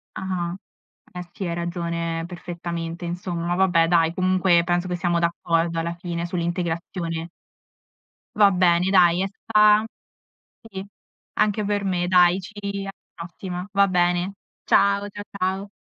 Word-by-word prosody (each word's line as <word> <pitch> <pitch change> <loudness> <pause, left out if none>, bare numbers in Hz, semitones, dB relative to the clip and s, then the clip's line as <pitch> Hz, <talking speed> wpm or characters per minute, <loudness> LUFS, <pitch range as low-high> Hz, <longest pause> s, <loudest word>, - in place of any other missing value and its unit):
Ah-ah. 180 -2 -3 0.6
Eh 180 -1 -7
sì, 195 -4 -4
hai 170 - -2
ragione 170 -1 -3
perfettamente 170 -1 -6
insomma. 175 0 -3
Vabbè 175 -3 +3
dai, 165 -1 +3
comunque 185 -2 +3
penso 175 +1 0
che 180 - -2
siamo 175 -1 0
d'accordo 170 0 0
alla 170 +1 -3
fine 170 -1 -4
sull'integrazione. 170 -1 -3 1.1
Va 205 -1 +6
bene, 180 -1 +3
dai 180 -2 +5
è 195 - 0
sta 210 +1 +3 0.8
sì, 195 -4 -8 0.5
anche 210 0 +1
per 205 0 -1
me, 180 -2 0
dai, 180 0 +5
ci 205 - -11 0.3
alla 195 0 -5 0.2
prossima. 180 +2 -7
Va 200 0 +4
bene. 180 +1 +1 0.3
Ciao, 200 0 +3
cia 205 +1 -8 0.2
ciao. 190 +2 -1
175 Hz, 135 wpm, -23 LUFS, 170-190 Hz, 1.1 s, Va